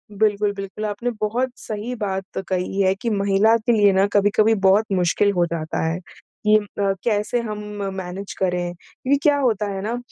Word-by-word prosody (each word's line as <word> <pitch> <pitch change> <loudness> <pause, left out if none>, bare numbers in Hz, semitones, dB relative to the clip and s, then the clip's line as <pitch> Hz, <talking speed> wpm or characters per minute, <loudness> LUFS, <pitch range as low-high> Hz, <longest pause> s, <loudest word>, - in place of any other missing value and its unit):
बिल्कुल, 205 0 +1
बिल्कुल, 195 +2 -6
आपने 210 +3 -2
बहुत 235 +5 0
सही 215 +3 -5
बात 195 -3 -4
कही 185 +1 -1
है 190 -1 +3
कि 230 +4 -3
महिला 200 +1 +3
के 230 +1 0
लिए 205 -3 +5
ना 190 +1 +4
कभी-कभी 210 +2 +4
बहुत 200 +3 +5
मुश्किल 185 +2 +2
हो 175 -3 +2
जाता 160 -1 -3
है 165 +2 -1 0.5
कि 210 0 +6
अ, 200 -1 -1
कैसे 215 +1 0
हम 215 -2 -5 0.4
मैनेज 190 +1 -6
करें, 180 -2 0
क्योंकि 255 +9 -2
क्या 290 -1 +4
होता 225 -6 +1
है 195 -1 -4
ना 225 +4 -2
205 Hz, 180 wpm, -22 LUFS, 190-215 Hz, 0.5 s, कि